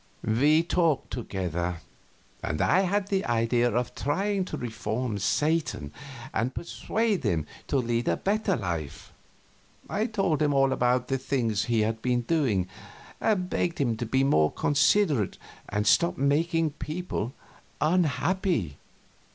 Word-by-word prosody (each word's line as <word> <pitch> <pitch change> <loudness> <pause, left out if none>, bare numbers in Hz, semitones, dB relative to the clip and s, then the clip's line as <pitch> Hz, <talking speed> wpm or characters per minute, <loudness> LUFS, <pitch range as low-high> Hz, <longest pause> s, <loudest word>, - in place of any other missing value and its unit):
We 145 +9 +4
talked 170 -4 +1
together, 90 -6 -3 0.6
and 75 - -3
I - - +4
had 195 +1 0
the 195 -1 +1
idea 120 +1 +2
of 120 +1 -1
trying 195 +6 0
to - - -5
reform 115 -1 -3
Satan 145 - 0 0.4
and 120 +4 -1
persuade 215 +3 -1
him 80 -3 0 0.2
to 140 - +1
lead 120 -1 0
a - - +2
better 205 -1 0
life. 85 -7 -5 0.7
I 215 +3 -1
told 195 -9 0
him 150 -1 +3
about 130 -2 +3
all - - -20
those 135 0 -2
things 115 -8 0
he 115 0 +1
had 110 +1 -1
been 125 0 +1
doing, 120 - +1 0.5
and 190 -5 +1
begged 175 -1 -1
him 120 -6 +1
to 120 - -3
be 130 +3 +2
more 75 - +3
considerate 145 - +2 0.3
and 105 0 -1
stop 170 +10 +3
making 155 +3 +1
people 145 - -4 0.5
unhappy. 170 - +1
135 Hz, 135 wpm, -27 LUFS, 110-170 Hz, 0.7 s, We